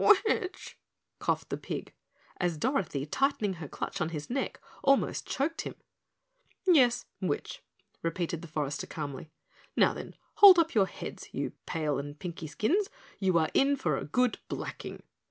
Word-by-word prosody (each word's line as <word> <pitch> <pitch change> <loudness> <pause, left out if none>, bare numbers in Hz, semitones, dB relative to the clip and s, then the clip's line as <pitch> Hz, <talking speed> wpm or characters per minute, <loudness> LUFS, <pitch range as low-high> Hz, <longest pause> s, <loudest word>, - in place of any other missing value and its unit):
"Witch?" 370 -3 -2 0.4
coughed - - -1
the - - -2
pig, - - -5 0.5
as 175 -3 0
Dorothy, 180 - 0
tightening 210 - +1
her 150 - -5
clutch 195 - -4
on 160 - +1
his 155 +4 -5
neck, 270 +1 -2 0.2
almost 275 -1 +3
choked 310 +5 -1
him. - - -6 0.9
"Yes, 255 -9 +5 0.2
witch," 170 -6 -2 0.4
repeated 170 0 -2
the 170 - -8
forester 145 -3 -2
calmly. 150 0 -5 0.5
"Now, - - +5
then, - - -8 0.2
hold 390 -3 +11
up 330 -1 +3
your 200 -4 +4
heads, - - -8
you - - -2 0.2
pale 155 -4 0
and 145 +1 -6
pinky 170 -1 -6
skins, 350 - +1
for 210 - -17
you 185 -2 +4
are 160 -1 +2
in 280 +1 +4
for 155 - 0
a 135 - -3
good 250 - +1
blacking." - - -6
180 Hz, 155 wpm, -30 LUFS, -, 0.9 s, hold